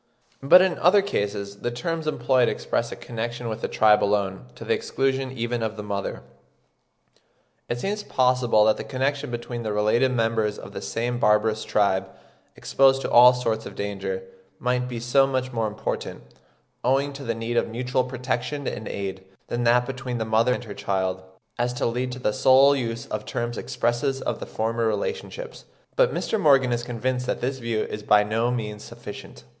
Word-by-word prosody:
But 180 +7 +7
in 190 -2 0
other 195 +3 +5
cases 100 - -3
the 120 - -3
terms 160 +7 -3
employed 125 -3 +2
express 120 0 -2
a - - -5
connection 120 +1 -5
with 110 0 -5
the - - -1
tribe 105 -1 +4
alone, 100 -2 0
to - - -9
the - - +2
exclusion 135 -1 -1
even 120 -1 -2
of 110 -1 -3
the 105 - -5
mother. 100 -1 -4 1.5
It 120 - -2
seems 205 +8 -2
possible 125 - +3
that 110 - +3
the - - -5
connection 135 +1 -2
between 120 0 -5
the 110 -2 -3
related 110 +5 +2
members 115 -3 0
of - - -10
the - - -5
same 120 +1 -2
barbarous 105 0 +2
tribe, 95 -2 +1 0.5
exposed 135 0 +3
to - - -3
all 125 +1 +9
sorts 115 -3 -2
of - - -10
danger, 95 -2 -4 0.3
might 125 0 0
be 120 -2 -5
so 130 +3 +3
much 130 -1 -2
more 115 -2 0
important, 105 0 -4 0.6
owing 135 +3 +1
to 140 0 -8
the 115 -3 -2
need 115 +1 -3
of - - +2
mutual 125 +3 -1
protection 130 +2 -3
and 110 - -4
aid, 95 -1 -5 0.3
than 120 0 -1
that 120 +1 +4
between 125 -1 -4
the 110 - -2
mother 110 +3 +2
and - - -6
her 105 -4 -8
child, 95 -2 -2 0.4
as 120 +1 0
to 125 - -2
lead 125 +2 -1
to - - -6
the 115 -4 -1
sole 135 +4 +6
use 115 -3 -3
of 105 0 -3
terms 120 +2 -3
expressive 135 +5 -1
of - - -2
the - - -7
former 115 +1 -1
relationships; 470 - -4 0.3
but - - +4
Mr. 220 - -1
Morgan 135 -5 +5
is 120 0 0
convinced 125 +1 -2
that - - -1
this 130 +2 -2
view 115 -3 -1
is 105 - -6
by 105 0 +4
no 110 +3 0
means 105 -4 -4
sufficient. - - -10
120 Hz, 185 wpm, -24 LUFS, 110-130 Hz, 1.5 s, all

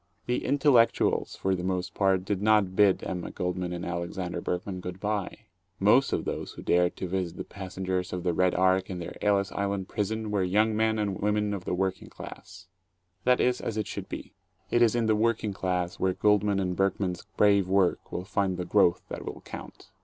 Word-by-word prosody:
The 125 - -1
"intellectuals" 140 -5 +3
for 95 - 0
the 90 -1 -2
most 90 -1 -2
part 95 -2 +2
did 100 -1 -1
not 105 -3 +3
bid 100 -2 +4
Emma 90 -2 -4
Goldman 90 0 -3
and 90 0 -4
Alexander 85 0 -3
Berkman 90 +2 -3
good 90 0 -7
bye. 105 -1 -2 0.4
Most - - +4
of - - -1
those - - -4
who - - -10
dared 90 0 +2
to 95 - -4
visit 90 -1 -3
the - - -4
passengers 95 -1 -4
of 90 -1 -4
the 90 - +1
"Red 90 +1 +2
Ark" 95 +1 +2
in 95 - -4
their 85 - -6
Ellis 100 -1 +2
Island 100 -1 -2
prison 110 +1 -2
were 100 -2 +1
young 105 +4 +2
men 110 0 +2
and 100 -3 -2
women 105 0 +1
of 95 -3 -5
the - - -1
working 95 0 -2
class. 90 0 -11 0.6
That 125 0 +4
is 125 0 +2
as 110 - -3
it 110 - 0
should - - -6
be. - - -7 0.4
It 120 - +3
is 115 -1 +4
in 120 -1 +1
the 110 -1 +3
working 110 -1 +1
class 90 -2 -2
where 95 -1 +2
Goldman 105 +1 +2
and 90 -2 -1
Berkman's 95 -2 -1
brave 100 -2 +4
work 95 -1 +1
will 90 - -4
find 95 -2 0
the 90 - -3
growth 95 -4 +3
that - - -6
will - - -7
count. - - -10
95 Hz, 205 wpm, -28 LUFS, 90-105 Hz, 0.6 s, bid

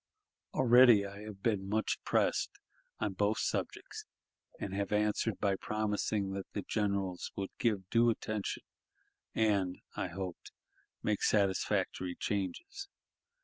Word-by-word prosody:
Already 120 -4 +7
I 100 0 -8
have 105 -2 -9
been 100 -4 0
much 110 +1 0
pressed - - +2 0.5
on 105 -2 -1
both 105 +3 +1
subjects, - - -3 0.5
and 95 - -4
have 100 0 -2
answered 105 +1 +1
by 100 -1 +2
promising 105 -1 -1
that 95 0 -5
the 100 - -3
generals 100 -4 -1
would 95 -1 -3
give 105 -6 +1
due 120 0 +5
attention, 110 -2 -2 0.7
and, 100 -5 +2 0.2
I - - -1
hoped, 90 0 -6 0.5
make 105 -2 +1
satisfactory 95 -2 +1
changes. 360 - -3
105 Hz, 120 wpm, -33 LUFS, 95-110 Hz, 0.7 s, Already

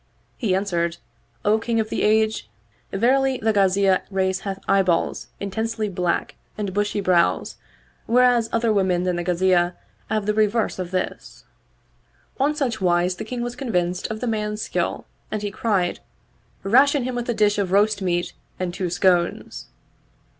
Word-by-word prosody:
He 205 -7 0
answered, 170 -3 -1 0.5
"O 215 +2 +4
King 230 0 -1
of 220 -1 -1
the - - -2
Age, 220 - +2 0.4
verily 260 +5 +2
the 220 -1 +1
Ghaziyah 195 -1 +3
race 190 -1 0
hath 195 -1 -4
eye 195 0 +4
balls 175 -3 0
intensely 220 +2 -2
black 180 -2 -1 0.2
and 205 -3 -3
bushy 205 +1 0
brows, 180 -3 +1 0.5
whereas 245 -1 +4
other 230 -1 +1
women 185 -3 +1
than 180 -1 0
the 175 - -2
Ghaziyah 180 0 +2 0.3
have 215 -2 -1
the 210 - +1
reverse 215 -1 +1
of 180 -2 -3
this." 185 0 -4 1.0
On 290 +3 +2
such 245 -8 -2
wise 180 0 +2
the - - -5
King 245 +2 -4
was 240 0 -4
convinced 180 -8 -1
of 220 0 -5
the - - -1
man's 210 -1 -2
skill - - -2 0.2
and 215 -1 -3
he 205 - -2
cried, 195 -4 0 0.4
" - - -37
Ration 270 +6 +4
him 255 +1 -3
with 245 0 -4
a - - +2
dish 210 -1 +2
of 190 -3 -1
roast 205 +1 +3
meat 175 -2 -1 0.3
and 180 -1 -2
two 180 0 -2
scones." 175 - 0
200 Hz, 165 wpm, -23 LUFS, 185-220 Hz, 1.0 s, O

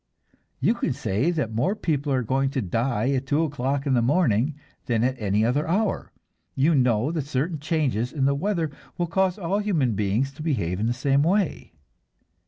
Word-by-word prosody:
You - - +3
can - - -1
say 110 - 0
that 150 -10 -1
more 130 - +1
people 150 -7 -1
are 130 -2 +1
going 135 +4 +1
to - - +2
die 115 +5 0
at 135 -1 -1
two 150 +4 +2
o'clock 140 -1 -1
in 140 - +1
the 120 - +3
morning 135 - +2 0.3
than 115 -2 +1
at 130 +1 +1
any 105 +1 +2
other 140 +6 +1
hour. 195 +5 0 0.4
You 150 +5 +3
know 125 -1 +2
that 155 -5 -3
certain 150 +3 -1
changes 140 -7 0
in 135 -3 0
the 140 - +3
weather 165 0 -1 0.3
will 175 - 0
cause 185 +2 +1
all 195 +1 -1
human 165 - +1
beings 105 +6 0
to 140 - -11
behave 100 - -1
in 110 - 0
the 120 - +1
same 135 +2 +2
way. 185 +3 0
140 Hz, 190 wpm, -25 LUFS, 120-160 Hz, 0.4 s, You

